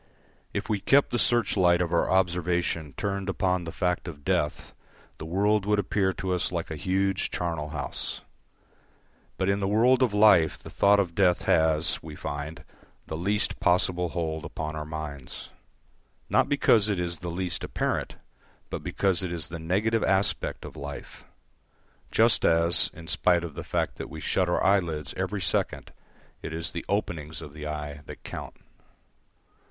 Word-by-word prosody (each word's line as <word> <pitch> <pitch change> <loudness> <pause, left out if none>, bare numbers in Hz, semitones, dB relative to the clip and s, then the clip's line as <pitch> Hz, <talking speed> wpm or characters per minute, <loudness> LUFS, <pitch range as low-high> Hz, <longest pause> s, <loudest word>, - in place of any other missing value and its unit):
If - - -3
we 105 - 0
kept 140 +8 +3
the 120 - 0
search 120 -2 +2
light 90 -3 +4
of 90 -1 -1
our 85 - +2
observation 90 -4 0
turned 100 -1 -2
upon 90 -2 0
the 80 - -5
fact 90 0 -1
of 75 -4 -9
death, 75 - -1 0.5
the 80 - -6
world 100 +4 +2
would 105 0 +3
appear 100 -1 +1
to 95 0 -2
us 90 - -1
like 85 -2 -3
a - - -3
huge 95 +4 0
charnel 80 -4 -3
house; 75 -3 -4 1.2
but 95 - 0
in 100 +1 +2
the 95 - 0
world 120 +5 +4
of 125 -4 +3
life 105 -6 +5
the - - -12
thought 100 0 +4
of 90 -4 0
death 90 -1 +3
has, 80 -1 +2
we - - -9
find, 75 +3 -5 0.4
the 80 - -5
least 100 +6 0
possible 90 0 +2
hold 80 -2 -3
upon 75 0 -5
our 75 0 -5
minds. 75 -4 -7 0.8
Not - - +3
because 115 -7 +4
it 100 - 0
is 85 -2 -2
the 90 - -5
least 90 +1 -3
apparent, - - -2 0.6
but - - -3
because 95 -4 +1
it 90 -2 -3
is 85 -2 -1
the 85 0 -6
negative 105 +7 +1
aspect 95 0 0
of - - -9
life; 70 0 -8 0.8
just 115 +1 +4
as, 85 +1 +5
in 80 0 -11
spite 85 0 +2
of 85 -3 -6
the - - -6
fact - - -2
that - - -6
we - - -8
shut 90 -2 0
our 85 - +1
eyelids 85 -7 +1
every 95 +2 -2
second, 85 - -1 0.5
it - - -6
is 80 +2 -1
the 85 - -5
openings 80 -6 -2
of 70 - -9
the 75 0 -6
eye 75 -1 -5
that - - -10
count. - - -7
90 Hz, 170 wpm, -27 LUFS, 80-100 Hz, 1.2 s, life